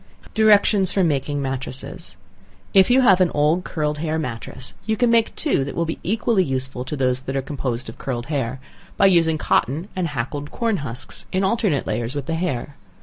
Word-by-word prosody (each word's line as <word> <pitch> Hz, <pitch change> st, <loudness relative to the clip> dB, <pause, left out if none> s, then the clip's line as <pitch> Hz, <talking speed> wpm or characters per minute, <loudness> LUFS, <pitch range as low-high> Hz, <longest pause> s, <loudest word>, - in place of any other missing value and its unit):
Directions 210 Hz, -3 st, +4 dB
for 195 Hz, -, +2 dB
Making 145 Hz, -2 st, 0 dB
Matresses. 130 Hz, -1 st, -4 dB, 0.6 s
If 190 Hz, +2 st, +6 dB
you 255 Hz, +2 st, +5 dB
have 190 Hz, -7 st, +5 dB
an 180 Hz, -, +4 dB
old 150 Hz, +5 st, +2 dB
curled 150 Hz, -4 st, -2 dB
hair 160 Hz, 0 st, -1 dB
matress, 125 Hz, -7 st, -4 dB
you 220 Hz, 0 st, +1 dB
can 240 Hz, 0 st, +3 dB
make 230 Hz, -1 st, +3 dB
two, 290 Hz, -, +1 dB
that 140 Hz, -, -5 dB
will 170 Hz, -, 0 dB
be 160 Hz, -, -4 dB
equally 215 Hz, 0 st, +1 dB
useful 130 Hz, -3 st, -2 dB
as 150 Hz, -, -2 dB
those 130 Hz, -1 st, +1 dB
that 135 Hz, +1 st, -5 dB
are 135 Hz, -, +1 dB
composed 130 Hz, -4 st, -3 dB
of 115 Hz, -, -9 dB
curled 120 Hz, -3 st, -3 dB
hair, 130 Hz, -4 st, -2 dB, 0.4 s
by -, -, +5 dB
using 165 Hz, -4 st, +4 dB
cotton 155 Hz, -, 0 dB
and 185 Hz, -2 st, 0 dB
hackled 145 Hz, +2 st, -4 dB
corn 230 Hz, -4 st, 0 dB
husks, 125 Hz, -6 st, -5 dB
in 190 Hz, +1 st, +1 dB
alternate 195 Hz, -7 st, +1 dB
layers 115 Hz, +4 st, -2 dB
with 145 Hz, -2 st, -3 dB
the 165 Hz, -, -2 dB
hair. 145 Hz, -5 st, -3 dB
150 Hz, 195 wpm, -22 LUFS, 130-190 Hz, 0.6 s, If